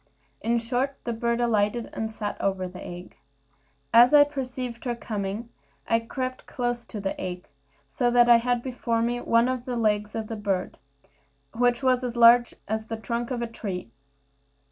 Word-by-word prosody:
In 235 +2 +1
short, 250 +4 -1
the 235 - -2
bird 235 +1 -1
alighted, 230 -1 +1
and 220 0 -3
sat 215 -2 -4
over 190 -1 0
the 180 0 -10
egg. 175 +1 -9 0.8
As 240 +5 +8
I 290 - +9
perceived 255 -4 -5
her 240 -1 -1
coming, 215 0 -4 0.4
I 230 - +3
crept 255 +2 -5
close 240 -1 -2
to 215 - -7
the 195 -1 -3
egg, 180 -1 -5 0.4
so 190 - 0
that 240 0 +5
I 240 -1 +8
had 245 0 0
before 235 -3 -1
me 240 +1 -1
one 230 +1 +3
of 255 -1 -2
the 250 - -3
legs 210 -2 0
of 225 -1 -2
the 225 - -5
bird, 200 -3 -2 0.7
which 245 +2 +1
was 255 -1 +3
as 245 -1 -3
big 240 0 +6
as 220 +1 -3
the 225 - -4
trunk 235 +1 -3
of 245 -2 -2
a - - -2
tree. 190 - -6
235 Hz, 180 wpm, -26 LUFS, 215-245 Hz, 0.8 s, I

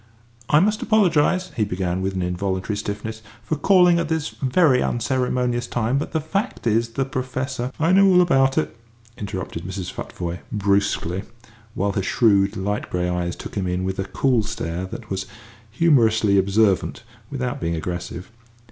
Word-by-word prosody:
"I 150 - +6
must 210 +4 +2
apologise," 185 -3 +2
he 110 - +1
began, 90 -2 -2
with 95 0 -2
an 95 - -1
involuntary 95 +3 -2
stiffness, 105 +2 -5 0.2
"for 155 - -1
calling 180 +1 +5
at 170 -2 -2
this 160 -1 -1
very 135 0 +2
unceremonious 125 0 0
time; 120 +3 0
but - - -4
the 160 - 0
fact 195 - -3
is, 115 +1 +1
the 135 +2 0
Professor 130 -1 -3
" - - -27
"I 165 +2 +3
know 195 +1 +6
all 180 -1 +6
about 135 -6 +3
it," 155 - 0 0.4
interrupted 95 -6 -5
Mrs. 95 0 -5
Futvoye, 85 -1 -5
brusquely, 100 -3 0 0.5
while 100 +1 0
her 100 - -1
shrewd, 100 -1 +2
light 100 +2 -2
grey 90 0 -1
eyes 90 0 -2
took - - -9
him 95 -3 -2
in 90 +1 -1
with 95 0 -3
a 95 - -1
cool 125 +2 +1
stare 95 -5 -4
that 110 +2 -9
was 95 0 -3 0.4
humorously 110 -6 +3
observant 100 +2 +1 0.3
without 125 -3 -3
being 85 0 -1
aggressive. 85 +3 -5
110 Hz, 165 wpm, -22 LUFS, 95-135 Hz, 0.5 s, I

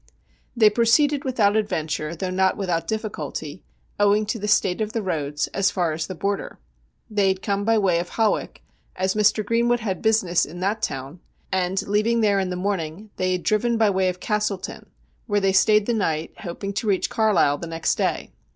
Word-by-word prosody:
They 215 -3 +5
proceeded 275 +6 +3
without 220 -7 +2
adventure, 160 -6 -2
though 185 +2 -3
not 190 0 +2
without 180 -4 -2
difficulty, 180 -7 -5 0.4
owing 205 +1 +3
to 225 +2 -3
the 210 - -3
state 190 -1 +2
of 215 0 -2
the 225 -3 -2
roads, 150 -5 -2
as 195 -1 +2
far 175 -5 0
as 155 +1 -3
the 185 - -6
Border. 200 +3 -3 0.5
They 205 -3 +1
had 190 0 0
come 200 -1 -1
by 225 0 +3
way 185 -5 +2
of 175 +1 -4
Hawick, 220 -2 0 0.3
as 190 +1 0
Mr. 210 0 +2
Greenwood 235 +2 +1
had 195 -4 -3
business 215 -6 +2
in 175 +3 -7
that 205 +3 -1
town, 135 +5 -4 0.3
and 190 +1 -1
leaving 215 +3 +2
there 205 -2 +3
in 190 -1 -1
the 180 - -3
morning 190 +1 -3
they 185 0 0
had 180 - -3
driven 230 +2 +1
by 220 -2 +3
way 190 -1 +1
of 180 0 -5
Castleton, 210 -2 -3 0.4
where 205 -2 +2
they 195 -1 +1
stayed 210 +2 +4
the 240 - 0
night, 165 -8 -1
hoping 195 +2 -5
to 200 +3 -3
reach 195 -3 +1
Carlisle 210 -10 +2
the 170 - -6
next 165 0 0
day. - - -2
200 Hz, 195 wpm, -23 LUFS, 180-215 Hz, 0.5 s, They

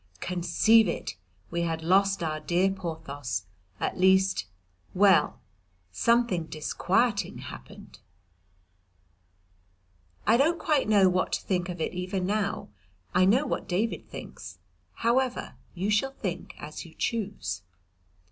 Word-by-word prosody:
Conceive 205 +5 +3
it, 170 - -3 0.4
we 170 0 -1
had 165 -1 -2
lost 195 +2 +3
our 155 -1 -2
dear 180 +5 +2
Porthos 160 - -4 0.4
at - - -2
least 190 - +4 0.5
well 195 -1 +4 0.5
something 230 - +2
disquieting 200 +8 0
happened. - - -11 2.3
I 225 +2 +5
don't 320 +6 +3
quite 295 -9 +1
know 200 -3 +6
what 185 0 +1
to - - 0
think 180 -2 -1
of 180 -1 -5
it 160 - -2
even 180 +1 -2
now. 205 +1 -1 0.4
I 185 +1 +5
know 245 +10 +4
what - - -3
David 205 +6 -1
thinks. - - -9 0.4
However, 250 +2 0 0.2
you 195 +4 -1
shall 270 +6 +1
think 185 -9 -5
as 150 +1 -7
you 165 - -14
choose. 205 - -2
190 Hz, 120 wpm, -28 LUFS, 170-215 Hz, 2.3 s, know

